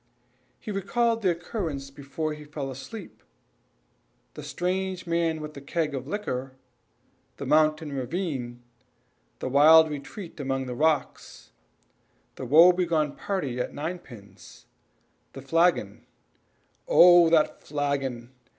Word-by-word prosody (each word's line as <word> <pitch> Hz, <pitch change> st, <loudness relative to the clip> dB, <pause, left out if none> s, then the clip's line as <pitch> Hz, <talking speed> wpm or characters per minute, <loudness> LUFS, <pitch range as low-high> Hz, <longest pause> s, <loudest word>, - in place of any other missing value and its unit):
He 215 Hz, -, -7 dB
recalled 230 Hz, +4 st, 0 dB
the 190 Hz, -, +2 dB
occurrences 165 Hz, -6 st, -4 dB
before 145 Hz, +3 st, -5 dB
he 150 Hz, 0 st, -10 dB
fell 145 Hz, -2 st, -6 dB
asleep. 135 Hz, -, -10 dB, 1.1 s
The -, -, -9 dB
strange 185 Hz, 0 st, -3 dB
man 165 Hz, -2 st, 0 dB
with 150 Hz, 0 st, -8 dB
a -, -, -8 dB
keg 150 Hz, +1 st, -2 dB
of 135 Hz, -1 st, -5 dB
liquor 135 Hz, -9 st, -4 dB, 0.8 s
the -, -, -6 dB
mountain 155 Hz, -1 st, +2 dB
ravine 130 Hz, -4 st, -4 dB, 0.7 s
the -, -, -5 dB
wild 155 Hz, +4 st, +6 dB
retreat 165 Hz, +5 st, -8 dB
among 135 Hz, -1 st, -2 dB
the 125 Hz, -, -5 dB
rocks 145 Hz, -, -2 dB, 0.8 s
the 130 Hz, -, -7 dB
woe 165 Hz, +7 st, +8 dB
begone 165 Hz, -5 st, 0 dB
party 145 Hz, -11 st, -3 dB
at 125 Hz, -, -4 dB
ninepins 140 Hz, -, -9 dB, 0.7 s
the 135 Hz, -, -9 dB
flagon 165 Hz, +5 st, +1 dB, 0.8 s
"Oh! 175 Hz, -, +7 dB
that 160 Hz, -2 st, +2 dB
flagon! 135 Hz, -4 st, -3 dB
155 Hz, 115 wpm, -26 LUFS, 135-175 Hz, 1.1 s, woe